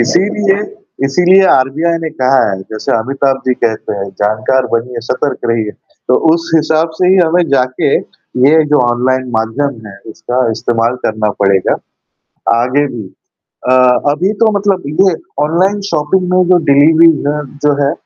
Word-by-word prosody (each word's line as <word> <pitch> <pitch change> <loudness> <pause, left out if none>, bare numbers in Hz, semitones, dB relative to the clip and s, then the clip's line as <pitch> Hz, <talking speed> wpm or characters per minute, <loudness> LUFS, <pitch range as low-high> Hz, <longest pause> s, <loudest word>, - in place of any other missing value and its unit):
इसीलिए, 195 - +1 0.5
इसीलिए 180 +7 +4
आरबीआई 160 +6 +1
ने 160 - -3
कहा 130 -5 +1
है 95 -1 -4
जैसे 110 +2 -4
अमिताभ 135 +3 -1
जी 125 - +2
कहते 110 -3 -2
हैं 100 0 -5
जानकार 110 +5 0
बनिए, 115 +1 -2
सतर्क 130 +1 -2
रहिए। 110 -2 -1 0.4
तो - - +4 0.2
उस 165 0 -2
हिसाब 160 +1 +1
से 180 - +2
ही 190 - +4
हमें 175 -1 +3
जाके 130 -2 0
ये 145 +5 0
जो 150 - +4
ऑनलाइन 130 +1 -1
माध्यम 115 +1 -3
है 100 -1 -11
इसका 125 +2 -2
इस्तेमाल 115 +1 -1
करना 110 -1 -1
पड़ेगा, 95 -1 +2 0.9
आगे 130 +4 +1
भी। 120 -4 -7 0.7
अ, - - +4 0.4
अभी 180 +8 0
तो 220 - +4
मतलब 195 -2 -1 0.2
ये 190 -2 +4 0.3
ऑनलाइन 185 +6 0
शॉपिंग 165 +4 0
में 185 0 +3
जो 180 - +5
डिलीवरी 155 +4 +5 0.2
है 150 +1 -1 0.2
जो 150 - +4
है 140 - +1
135 Hz, 155 wpm, -13 LUFS, 120-165 Hz, 0.9 s, जो